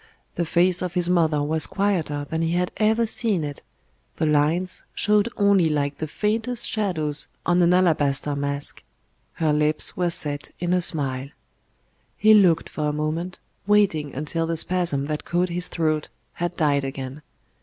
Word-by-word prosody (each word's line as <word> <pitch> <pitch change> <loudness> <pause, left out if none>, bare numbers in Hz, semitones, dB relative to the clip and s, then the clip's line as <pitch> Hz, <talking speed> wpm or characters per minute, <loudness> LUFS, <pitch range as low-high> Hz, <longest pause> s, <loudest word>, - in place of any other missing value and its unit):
The 170 - -2
face 175 +1 +3
of 180 -1 -4
his 175 0 +2
mother 160 -4 +2
was 155 +2 0
quieter 170 -8 -1
than 160 +2 -2
he 165 0 0
had 180 0 0
ever 220 +2 +2
seen 215 -6 +1
it, 145 -1 -6 0.5
the - - -1
lines 155 +5 +1
showed 210 +1 +3
only 200 -5 +4
like 145 -1 -1
the 155 - -3
faintest 225 +8 -2
shadows 160 -9 -1 0.2
on 175 +1 +3
an 170 0 +4
alabaster 150 -5 +2
mask; 140 0 -4 0.5
her 155 -2 0
lips 150 +1 +1
were 180 -1 0
set 150 -4 -1
in 175 +1 0
a 180 - +2
smile. 140 -5 0 0.9
He 215 +1 +5
looked 185 -6 +4
for 150 -1 -2
a - - -2
moment, 160 +4 -3 0.3
waiting 195 -10 +2
until 160 +4 -2
the 165 0 -2
spasm 170 -5 0
that 150 +1 -3
caught 175 +1 0
his 175 +1 -1
throat 155 -2 -1 0.2
had 175 0 -4
died 145 -4 +2
again. 135 +1 -6
165 Hz, 165 wpm, -23 LUFS, 150-180 Hz, 0.9 s, He